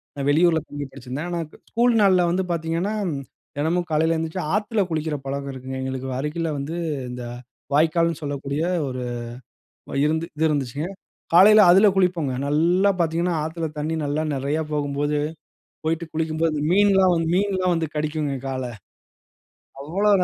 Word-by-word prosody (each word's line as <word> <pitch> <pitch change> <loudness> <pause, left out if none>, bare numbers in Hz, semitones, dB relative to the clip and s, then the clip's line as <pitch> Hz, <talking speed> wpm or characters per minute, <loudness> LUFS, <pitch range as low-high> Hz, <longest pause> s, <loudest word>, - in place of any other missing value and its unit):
நான் 140 -1 -2
வெளியூருல 160 +2 +4
தங்கி 145 0 -5
படிச்சிருந்தேன். 135 +5 -6
ஆனா, 175 -1 -2
க - - -16 0.2
ஸ்கூல் 240 +1 +3
நாள்ல 185 -3 +5
வந்து 185 +2 +1
பார்த்தீங்கன்னா, 165 +4 -1 0.7
தினமும் 170 +4 0
காலையில 160 +2 +2
எழுந்திரிச்சி 160 +3 -3
ஆத்துல 210 0 +1
குளிக்கிற 155 -2 -1
பழக்கம் 140 0 -3
இருக்குங்க 130 0 -6
எங்களுக்கு 130 0 -4
அருகில 155 +3 -2
வந்து, 140 +4 -4 0.4
இந்த 125 0 -6 0.5
வாய்க்கால்னு 165 +1 +2
சொல்லக்கூடிய 140 0 -3 0.3
ஒரு 130 -1 -4 1.0
இருந்து 160 +2 0 0.2
இருந்துச்சுங்க. 145 +2 -2 0.5
காலையில 210 +4 +8
அதுல 195 +3 +7
குளிப்போங்க. 175 -8 +1
நல்லா 170 +7 +3
பார்த்திங்கன்னா 170 +1 +1
ஆத்துல 160 +1 -3
தண்ணி 160 +2 -1
நல்லா 145 +2 -1
நிறையா 140 +4 -1
போகும்போது, 145 0 0 0.7
போயிட்டு 165 +1 -1
குளிக்கும்போது 160 0 0
மீன்லாம் 195 -2 +5
வந்து, 165 -1 0
மீன்லாம் 185 -3 +1
வந்து 165 -2 -1
கடிக்குங்க 150 -2 -1
கால. 130 -1 -3 1.2
அவ்வளோ 195 +8 +1
160 Hz, 135 wpm, -23 LUFS, 145-175 Hz, 1.2 s, காலையில